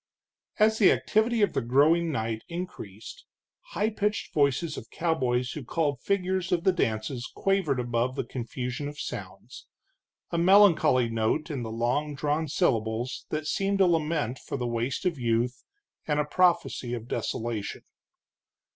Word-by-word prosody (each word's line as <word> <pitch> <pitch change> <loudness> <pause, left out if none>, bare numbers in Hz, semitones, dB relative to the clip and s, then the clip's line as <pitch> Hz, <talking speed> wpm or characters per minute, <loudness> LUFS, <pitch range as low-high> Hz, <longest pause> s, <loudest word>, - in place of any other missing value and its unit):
As 220 0 +3
the 200 - +7
activity 220 +1 +2
of 205 - +2
the - - 0
growing 155 +7 +3
night 110 -4 -2
increased, 170 - -7 0.5
high 215 +2 +1
pitched 210 0 -2
voices 145 +2 +1
of 110 - -9
cowboys 125 -7 0
who 150 - -6
called 145 0 -1
figures 185 -2 -1
of 175 -2 +1
the 190 - +5
dances 120 -5 -2
quavered 190 -9 +1
above 120 +1 -1
the - - -1
confusion 125 +2 -4
of 145 0 -8
sounds, 95 +4 -8 0.6
a 170 - 0
melancholy 175 - +5
note 115 +8 -1
in 135 -4 -3
the 115 - -4
long 125 +7 -1
drawn 150 +2 -1
syllables 115 -2 -1
that 155 0 -3
seemed 195 +5 0
a 190 - +6
lament 155 -6 0
for - - -5
the 125 - -3
waste 120 +6 -2
of 170 -6 0
youth, 120 +1 0 0.5
and 150 -1 +1
a 150 - +1
prophecy 170 -7 +1
of 115 -1 -7
desolation. 115 -4 -3
145 Hz, 150 wpm, -27 LUFS, 120-170 Hz, 0.6 s, the